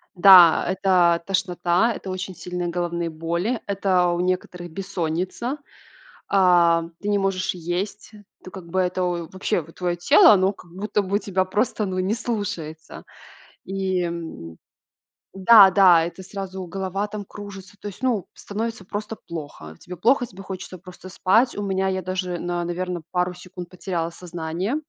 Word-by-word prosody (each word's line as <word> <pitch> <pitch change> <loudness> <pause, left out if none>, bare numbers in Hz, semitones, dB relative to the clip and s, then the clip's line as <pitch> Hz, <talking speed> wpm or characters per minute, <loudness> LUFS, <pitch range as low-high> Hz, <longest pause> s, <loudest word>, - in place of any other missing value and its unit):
Да, 180 -2 +8
это 180 -2 +3
тошнота, 185 +2 +1
это 190 - -8
очень 185 0 -5
сильные 175 +1 -4
головные 170 -1 -2
боли, 170 +9 -2
это 190 -2 +2
у 175 0 -1
некоторых 180 -1 -2
бессонница, 190 - -3 0.7
а, 175 -3 +4 0.2
ты 205 - -4
не 205 0 +2
можешь 195 -2 -1
есть. 180 +5 -4 0.3
То, - - -9
как 185 -2 -10
бы, 190 +3 0
это, 180 0 0
в 175 -2 -2
вообще, 190 -1 -1
вот, 165 +1 -14
твоё 175 -1 -1
тело, 175 +4 +7
оно 190 0 +3
как 175 -3 -17
будто 205 +2 -1
бы 200 +1 0
тебя 190 -3 -1
просто, 210 +3 -1
ну, 185 -1 -3
не 190 +4 0
слушается. 205 -10 -5 0.6
И, 190 -1 -1
м, 165 - -6 0.7
да, 195 0 +8
да, 180 -4 +6
это 175 +3 -7
сразу 190 -1 -6
голова 195 +3 -3
там 210 0 -6
кружится, 200 -1 -10
то 205 - -6
есть, 200 +6 -11
ну, 235 -8 0
становится 220 0 -5
просто 210 +3 -5
плохо. 145 - -8
Тебе 180 - -9
плохо, 245 - +2
тебе 195 -3 -12
хочется 190 -1 -7
просто 180 +1 -12
спать. 220 +7 +2
У 205 - -3
меня, 190 -1 0
я 190 0 -2
даже, 180 -1 -3
на 175 0 -2
наверно, 175 0 -3
пару 180 0 0
секунд 180 0 -10
потеряла 175 -2 -3
сознание. 175 - -4
185 Hz, 160 wpm, -23 LUFS, 175-195 Hz, 0.7 s, Да